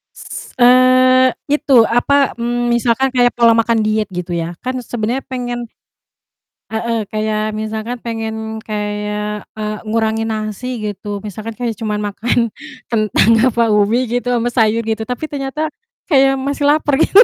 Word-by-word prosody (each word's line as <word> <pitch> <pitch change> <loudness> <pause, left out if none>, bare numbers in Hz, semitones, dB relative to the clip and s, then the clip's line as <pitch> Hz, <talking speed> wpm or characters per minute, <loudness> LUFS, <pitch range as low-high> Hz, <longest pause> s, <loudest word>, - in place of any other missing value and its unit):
S - - -9
eee, 255 +1 +6 0.2
itu 275 -5 +5
apa, 275 +4 +2
eee, 240 +1 -1
misalkan 240 +3 +2
kayak 245 -1 +4
pola 230 -1 +6
makan 230 0 +2
diet 215 -1 0
gitu 180 -1 -4
ya, 170 +1 -3
kan 255 0 -2
sebenernya 240 +2 -3
pengen 245 -2 -4 1.0
heeh, 225 0 -1
kayak 215 0 -1
misalkan 220 +3 -4
pengen 225 -1 -4 0.3
kayak, 210 0 -3 0.2
eee, 215 0 -3
ngurangin 220 0 0
nasi 220 +3 -4
gitu 205 -1 -5
misalkan 215 +2 -6
kayak 235 -3 -2
cuman 210 -2 -2
makan 210 +3 -2 0.5
kentang 215 -1 +2 0.2
apa 235 +1 +2
ubi 215 +4 +2
gitu 245 +1 -1
ama 235 +1 0
sayur 225 -1 +2
gitu 220 0 -1
tapi 250 +7 -4
ternyata, 285 +2 -3 0.4
kayak 270 -1 +5
masih 280 +2 -1
lapar 290 -1 +2
gitu. 400 +7 +7
230 Hz, 145 wpm, -17 LUFS, 215-255 Hz, 1.0 s, gitu